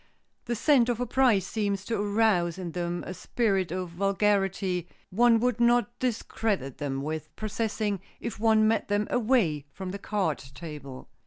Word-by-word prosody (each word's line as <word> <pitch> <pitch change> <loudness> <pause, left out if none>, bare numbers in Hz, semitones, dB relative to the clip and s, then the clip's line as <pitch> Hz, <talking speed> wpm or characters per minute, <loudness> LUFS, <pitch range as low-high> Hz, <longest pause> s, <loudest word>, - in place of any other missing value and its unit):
The 240 - -1
scent 250 0 +4
of 240 -1 0
a 245 - 0
prize 235 -6 +3
seems 200 -2 -2
to 225 -3 -1
arouse 205 -5 +2
in 180 -3 -5
them 175 0 -3
a 185 - -5
spirit 195 -2 0
of 180 -1 -3
vulgarity 195 -1 +1 0.2
one 230 +3 +5
would 245 -2 +1
not 240 0 +2
discredit 215 - -2
them 135 -1 -2
with 155 +1 -4
possessing 215 -1 -2 0.2
if 230 -2 -5
one 220 -1 +4
met 225 - +1
them 205 +1 +1
away 215 - +2
from 185 +4 -6
the 200 - -6
card 195 -7 -1 0.2
table. 145 -5 -8
205 Hz, 160 wpm, -28 LUFS, 175-225 Hz, 0.2 s, one